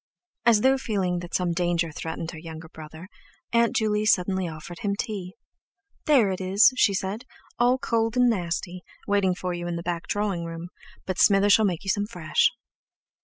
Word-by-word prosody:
As 225 Hz, -3 st, +5 dB
though 265 Hz, +2 st, +3 dB
feeling 190 Hz, -8 st, -1 dB
that 175 Hz, 0 st, -6 dB
some 180 Hz, -2 st, 0 dB
danger 170 Hz, -1 st, 0 dB
threatened 160 Hz, +2 st, -5 dB
her 160 Hz, -, -9 dB
younger 160 Hz, 0 st, -9 dB
brother, 160 Hz, +2 st, -11 dB, 0.5 s
Aunt 235 Hz, 0 st, +3 dB
Juley 210 Hz, -1 st, +1 dB
suddenly 190 Hz, -3 st, +1 dB
offered 165 Hz, +2 st, -9 dB
him 200 Hz, -1 st, -1 dB
tea: 200 Hz, -4 st, -5 dB, 0.7 s
"There 250 Hz, -10 st, +4 dB
it 185 Hz, -, -4 dB
is," 195 Hz, +7 st, +5 dB
she 200 Hz, -6 st, +3 dB
said, 195 Hz, +5 st, -3 dB, 0.4 s
"all 245 Hz, +2 st, +4 dB
cold 225 Hz, -2 st, -1 dB
and 250 Hz, 0 st, +5 dB
nasty, 180 Hz, -3 st, -2 dB, 0.3 s
waiting 200 Hz, -3 st, +2 dB
for 180 Hz, -1 st, -4 dB
you 175 Hz, 0 st, -5 dB
in 175 Hz, -, -3 dB
the 170 Hz, -, -5 dB
back 170 Hz, -1 st, -4 dB
drawing 205 Hz, -4 st, -1 dB
room, 165 Hz, +1 st, -7 dB, 0.4 s
but 185 Hz, -1 st, -3 dB
Smither 205 Hz, 0 st, +5 dB
shall 220 Hz, +2 st, +5 dB
make 180 Hz, -3 st, -1 dB
you 195 Hz, -, 0 dB
some 205 Hz, 0 st, -1 dB
fresh." 175 Hz, -7 st, +1 dB
190 Hz, 180 wpm, -25 LUFS, 175-210 Hz, 0.7 s, As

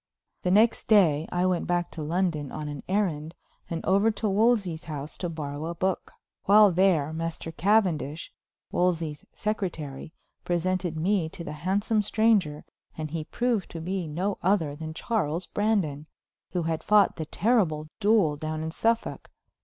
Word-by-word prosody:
The 180 Hz, -, 0 dB
next 215 Hz, +5 st, +3 dB
day 165 Hz, -8 st, +4 dB
I 180 Hz, +1 st, +1 dB
went 180 Hz, -2 st, 0 dB
back 175 Hz, -1 st, 0 dB
to 160 Hz, -, -7 dB
London 160 Hz, -3 st, -1 dB
on 155 Hz, -1 st, -5 dB
an 145 Hz, -2 st, -6 dB
errand, 170 Hz, -6 st, -1 dB, 0.3 s
and 165 Hz, -1 st, -4 dB
over 200 Hz, +4 st, +4 dB
to 220 Hz, 0 st, -2 dB
Wolsey's 200 Hz, -5 st, +2 dB
house 150 Hz, -2 st, -5 dB
to 175 Hz, -, -3 dB
borrow 150 Hz, -1 st, -5 dB
a 170 Hz, -, -4 dB
book. 185 Hz, +2 st, -2 dB, 0.3 s
While 205 Hz, 0 st, +7 dB
there 170 Hz, -5 st, +2 dB
Master 165 Hz, 0 st, -4 dB
Cavendish, 170 Hz, -5 st, +1 dB, 0.4 s
Wolsey's 165 Hz, -4 st, 0 dB
secretary, 165 Hz, -10 st, -4 dB, 0.3 s
presented 175 Hz, -1 st, -1 dB
me 175 Hz, 0 st, +1 dB
to 170 Hz, -, -8 dB
the 150 Hz, -, -6 dB
handsome 195 Hz, +8 st, 0 dB
stranger, 205 Hz, -8 st, +1 dB, 0.3 s
and 155 Hz, -1 st, -4 dB
he 160 Hz, -1 st, -3 dB
proved 240 Hz, 0 st, -1 dB
to 165 Hz, -, -7 dB
be 180 Hz, +1 st, -3 dB
no 185 Hz, +6 st, -2 dB
other 170 Hz, -6 st, +1 dB
than 160 Hz, +1 st, -7 dB
Charles 175 Hz, -5 st, -1 dB
Brandon, 180 Hz, -10 st, -1 dB, 0.4 s
who 175 Hz, -2 st, -2 dB
had 160 Hz, -1 st, -2 dB
fought 210 Hz, -1 st, +4 dB
the 160 Hz, -2 st, -4 dB
terrible 180 Hz, -9 st, +1 dB
duel 205 Hz, -8 st, +3 dB
down 155 Hz, +1 st, -4 dB
in 160 Hz, -, -3 dB
Suffolk. 230 Hz, +6 st, -1 dB
175 Hz, 155 wpm, -27 LUFS, 155-200 Hz, 0.4 s, While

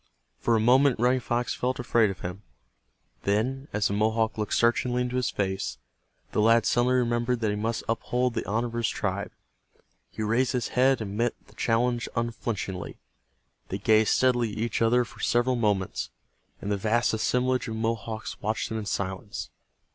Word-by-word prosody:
For 115 Hz, -, +2 dB
a -, -, +3 dB
moment 125 Hz, +3 st, +4 dB
Running 125 Hz, +2 st, +3 dB
Fox 120 Hz, 0 st, -1 dB
felt 130 Hz, +1 st, -1 dB
afraid 120 Hz, -4 st, +2 dB
of 95 Hz, -3 st, -6 dB
him. 90 Hz, +3 st, -5 dB, 0.8 s
Then, 125 Hz, +7 st, 0 dB
as 105 Hz, -1 st, +1 dB
the -, -, -2 dB
Mohawk 110 Hz, +2 st, +1 dB
looked 105 Hz, -1 st, -1 dB
searchingly 120 Hz, +1 st, +2 dB
into 125 Hz, 0 st, -3 dB
his 125 Hz, -1 st, +1 dB
face, 95 Hz, -1 st, -2 dB, 0.5 s
the -, -, +1 dB
lad 115 Hz, +2 st, +5 dB
suddenly 125 Hz, +1 st, +3 dB
remembered 120 Hz, 0 st, +1 dB
that 110 Hz, -2 st, +1 dB
he -, -, -1 dB
must 110 Hz, +2 st, -2 dB
uphold 125 Hz, +2 st, 0 dB
the 115 Hz, -, -2 dB
honor 115 Hz, +3 st, +1 dB
of 120 Hz, -, -5 dB
his 115 Hz, -1 st, 0 dB
tribe. -, -, -2 dB, 0.8 s
He 110 Hz, -, -5 dB
raised 115 Hz, +5 st, +1 dB
his 125 Hz, -2 st, -1 dB
head 130 Hz, 0 st, +3 dB
and 100 Hz, -2 st, -4 dB
met 120 Hz, +2 st, 0 dB
the -, -, -20 dB
challenge 120 Hz, +1 st, 0 dB
unflinchingly. 115 Hz, -5 st, -3 dB, 0.7 s
They 95 Hz, -, -2 dB
gazed 110 Hz, +2 st, +4 dB
steadily 120 Hz, -4 st, +2 dB
at -, -, -7 dB
each 115 Hz, +2 st, -1 dB
other 120 Hz, +2 st, +4 dB
for 115 Hz, -, -15 dB
several 120 Hz, +2 st, +2 dB
moments, 105 Hz, -5 st, 0 dB, 0.5 s
and 100 Hz, -, -2 dB
the 100 Hz, -, +1 dB
vast 115 Hz, +5 st, +1 dB
assemblage 125 Hz, +3 st, +1 dB
of 110 Hz, -, -4 dB
Mohawks 110 Hz, -1 st, -3 dB
watched 110 Hz, +2 st, -1 dB
them 110 Hz, -, -2 dB
in 105 Hz, -, -6 dB
silence. 95 Hz, +1 st, -4 dB
115 Hz, 180 wpm, -27 LUFS, 110-125 Hz, 0.8 s, lad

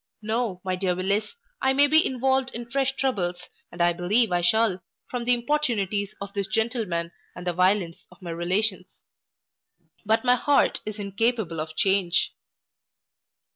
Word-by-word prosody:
No, 220 Hz, -4 st, -2 dB
my 185 Hz, -1 st, -1 dB
dear 180 Hz, -1 st, -1 dB
Willis, 200 Hz, -, -1 dB, 0.3 s
I 265 Hz, -, +3 dB
may 285 Hz, +2 st, +5 dB
be 315 Hz, +2 st, +5 dB
involved 265 Hz, +1 st, +1 dB
in 235 Hz, 0 st, -6 dB
fresh 270 Hz, +2 st, 0 dB
troubles, 185 Hz, -11 st, -1 dB, 0.3 s
and 175 Hz, 0 st, -1 dB
I 175 Hz, 0 st, +4 dB
believe 195 Hz, +6 st, +2 dB
I 175 Hz, 0 st, +1 dB
shall, 190 Hz, +1 st, +2 dB, 0.3 s
from 245 Hz, -1 st, -3 dB
the 245 Hz, -, +4 dB
importunities 220 Hz, -7 st, -1 dB
of 200 Hz, 0 st, -7 dB
this 200 Hz, -1 st, -2 dB
gentleman 215 Hz, -7 st, -1 dB, 0.2 s
and 180 Hz, -, -8 dB
the 175 Hz, -, 0 dB
violence 180 Hz, -1 st, +1 dB
of -, -, -18 dB
my 175 Hz, -3 st, -7 dB
relations; 185 Hz, +3 st, -1 dB, 1.0 s
but 220 Hz, +1 st, +1 dB
my 245 Hz, -, +6 dB
heart 280 Hz, +3 st, +2 dB
is 215 Hz, 0 st, -4 dB
incapable 205 Hz, -3 st, -1 dB
of 155 Hz, 0 st, -5 dB
change. 190 Hz, -1 st, +2 dB
205 Hz, 155 wpm, -25 LUFS, 180-240 Hz, 1.0 s, my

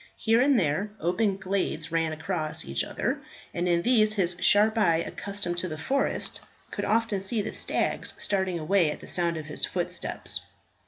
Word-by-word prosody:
Here 225 Hz, +2 st, +3 dB
and 275 Hz, -1 st, +4 dB
there 180 Hz, +5 st, 0 dB
open 195 Hz, +3 st, +1 dB
glades 190 Hz, -5 st, -2 dB
ran 165 Hz, -1 st, +1 dB
across 155 Hz, 0 st, -2 dB
each 70 Hz, +1 st, 0 dB
other, -, -, -2 dB, 0.3 s
and 175 Hz, +1 st, 0 dB
in 170 Hz, 0 st, +2 dB
these 215 Hz, -4 st, +4 dB
his 180 Hz, -4 st, +1 dB
sharp 215 Hz, +2 st, +5 dB
eye, 170 Hz, -7 st, +4 dB
accustomed 175 Hz, +1 st, -3 dB
to 185 Hz, -, -1 dB
the 155 Hz, -3 st, -5 dB
forest, 270 Hz, -, -1 dB, 0.3 s
could -, -, -3 dB
often 220 Hz, -2 st, +1 dB
see 205 Hz, +2 st, -1 dB
the 220 Hz, -, -4 dB
stags -, -, 0 dB
starting 190 Hz, -3 st, 0 dB
away 170 Hz, +1 st, +2 dB
at -, -, -4 dB
the -, -, -11 dB
sound 170 Hz, -2 st, 0 dB
of 155 Hz, -, -5 dB
his 150 Hz, -, -5 dB
footsteps. -, -, -2 dB
185 Hz, 175 wpm, -27 LUFS, 165-210 Hz, 0.3 s, sharp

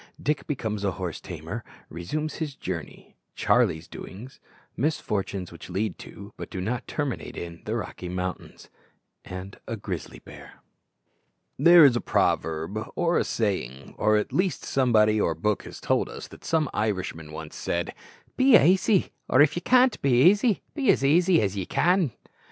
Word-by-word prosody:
_Dick 145 Hz, -1 st, -1 dB
becomes 110 Hz, -7 st, -3 dB
a 100 Hz, -2 st, 0 dB
horse 90 Hz, -4 st, -5 dB
tamer -, -, -6 dB, 0.2 s
Resumes 150 Hz, -, -4 dB
his 150 Hz, -4 st, -4 dB
journey -, -, -7 dB, 0.2 s
Charlie's 90 Hz, -10 st, +2 dB
doings 120 Hz, +8 st, -10 dB, 0.4 s
Misfortunes 100 Hz, -, -2 dB
which 85 Hz, -, -11 dB
lead 95 Hz, 0 st, -2 dB
to, -, -, -11 dB
but -, -, -7 dB
do 95 Hz, -, -5 dB
not 115 Hz, +7 st, -3 dB
terminate 145 Hz, -4 st, -4 dB
in, 85 Hz, -1 st, -7 dB
the -, -, -2 dB
Rocky 90 Hz, -, -5 dB
Mountains 90 Hz, 0 st, -5 dB, 0.6 s
A 95 Hz, +1 st, -7 dB
grizzly -, -, -6 dB
bear_. -, -, -13 dB, 1.1 s
There 170 Hz, -2 st, +8 dB
is 130 Hz, -4 st, +5 dB
a 120 Hz, -, 0 dB
proverb 80 Hz, +7 st, 0 dB
or 170 Hz, 0 st, +2 dB
a -, -, +2 dB
saying 70 Hz, -, -3 dB
or 105 Hz, 0 st, +4 dB
at 105 Hz, -, -2 dB
least 185 Hz, -1 st, 0 dB
somebody 110 Hz, -5 st, +3 dB
or 85 Hz, -, +1 dB
book 105 Hz, +5 st, -1 dB
has -, -, -9 dB
told -, -, 0 dB
us, -, -, -8 dB
that -, -, -14 dB
some 160 Hz, -2 st, +1 dB
Irishman 95 Hz, -7 st, -2 dB
once 80 Hz, 0 st, -8 dB
said, 85 Hz, 0 st, -2 dB, 0.4 s
"Be 260 Hz, -2 st, +7 dB
aisy; 185 Hz, +4 st, +3 dB, 0.2 s
or, 130 Hz, -, +4 dB
if 145 Hz, 0 st, +5 dB
ye 175 Hz, -, -2 dB
can't 255 Hz, +1 st, +4 dB
be 130 Hz, +1 st, +5 dB
aisy, 210 Hz, 0 st, +1 dB
be 280 Hz, -4 st, 0 dB
as -, -, +4 dB
aisy 170 Hz, -, +4 dB
as 100 Hz, -1 st, -1 dB
ye 95 Hz, -3 st, -3 dB
can." 175 Hz, -5 st, +2 dB
110 Hz, 160 wpm, -26 LUFS, 90-155 Hz, 1.1 s, There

